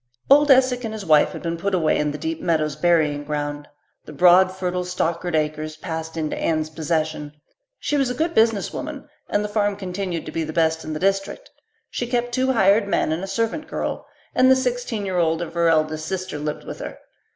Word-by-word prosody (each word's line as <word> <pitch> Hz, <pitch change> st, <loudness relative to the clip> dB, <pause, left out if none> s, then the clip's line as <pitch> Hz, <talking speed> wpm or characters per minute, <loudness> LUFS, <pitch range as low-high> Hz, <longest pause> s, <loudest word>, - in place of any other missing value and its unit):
Old 295 Hz, +1 st, +7 dB
Esek 255 Hz, -2 st, +4 dB
and 220 Hz, -1 st, -4 dB
his 210 Hz, -3 st, -7 dB
wife 155 Hz, -3 st, +5 dB
had -, -, -8 dB
been 170 Hz, 0 st, -2 dB
put 195 Hz, +3 st, -1 dB
away 160 Hz, -4 st, +2 dB
in 150 Hz, 0 st, +1 dB
the 145 Hz, -, -4 dB
Deep 160 Hz, +2 st, -4 dB
Meadows 155 Hz, -4 st, 0 dB
burying 150 Hz, -3 st, +2 dB
ground. 145 Hz, 0 st, -4 dB, 0.4 s
The -, -, -10 dB
broad, 180 Hz, +1 st, +5 dB
fertile 180 Hz, -1 st, -2 dB
Stockard 175 Hz, -1 st, -2 dB
acres 155 Hz, 0 st, -2 dB
passed 160 Hz, 0 st, -5 dB
into 155 Hz, -1 st, -2 dB
Anne's 155 Hz, -1 st, -1 dB
possession. 155 Hz, -2 st, -2 dB, 0.4 s
She 295 Hz, -, -1 dB
was 270 Hz, -3 st, +1 dB
a 250 Hz, -, -3 dB
good 325 Hz, +5 st, -1 dB
business 220 Hz, -, +2 dB
woman, 295 Hz, -1 st, -6 dB, 0.2 s
and 205 Hz, -, +1 dB
the -, -, -2 dB
farm 205 Hz, -1 st, 0 dB
continued 185 Hz, -3 st, -4 dB
to -, -, -6 dB
be 165 Hz, -, -2 dB
the 155 Hz, 0 st, -5 dB
best 160 Hz, 0 st, +1 dB
in 155 Hz, -, -5 dB
the 155 Hz, -, -4 dB
district. 195 Hz, -, -1 dB, 0.4 s
She 245 Hz, -, -3 dB
kept 245 Hz, 0 st, -1 dB
two 260 Hz, +1 st, +1 dB
hired 200 Hz, -1 st, +4 dB
men 180 Hz, -, +1 dB
and 165 Hz, +4 st, -2 dB
a -, -, -4 dB
servant 230 Hz, +9 st, -2 dB
girl, -, -, -4 dB, 0.3 s
and 260 Hz, -, +4 dB
the 260 Hz, -, +7 dB
sixteen 245 Hz, -4 st, -2 dB
year 185 Hz, -2 st, -1 dB
old 165 Hz, -1 st, +2 dB
of 170 Hz, -1 st, -5 dB
her 170 Hz, -1 st, +2 dB
oldest 155 Hz, 0 st, +1 dB
sister 185 Hz, -4 st, -4 dB
lived 150 Hz, 0 st, -4 dB
with -, -, -8 dB
her. -, -, -7 dB
175 Hz, 215 wpm, -22 LUFS, 155-220 Hz, 0.4 s, Old